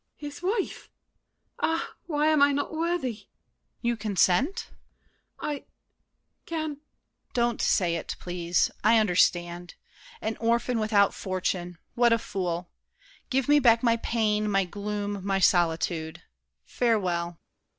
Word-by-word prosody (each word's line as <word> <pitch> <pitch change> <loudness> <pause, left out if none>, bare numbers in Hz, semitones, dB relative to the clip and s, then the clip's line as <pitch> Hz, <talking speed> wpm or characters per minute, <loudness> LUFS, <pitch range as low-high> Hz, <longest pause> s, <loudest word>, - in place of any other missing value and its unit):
His 290 0 -8
wife! 395 +2 -2 0.7
Ah, 325 0 0
why 300 -3 +1
am 310 -2 +3
I 285 0 +6
not 285 +3 -2
worthy? 330 -4 0
DIDIER. 205 -2 -16 0.6
You 235 0 +1
consent? 215 - +1 0.7
MARION. 295 -2 -3
I—can— 315 -2 -9
DIDIER. 290 -1 -9 0.5
Don't 240 -2 +1
say 175 -3 +2
it, 165 - -5
please—I 180 +5 +1
understand! 175 -3 +1 0.4
An 220 - -3
orphan, 235 +1 +1
without 210 -2 +3
fortune! 180 -2 -3 0.2
What 240 -1 +4
a - - +4
fool! 180 -5 -4 0.6
Give 265 -1 +1 0.2
back 230 -2 +5
my 230 -1 +3
pain, 215 -2 0
my 195 -1 +2
gloom, 205 +1 -4
my 195 0 +1
solitude! 165 -3 +1 0.4
Farewell! 180 -8 0
215 Hz, 120 wpm, -27 LUFS, 180-250 Hz, 0.7 s, I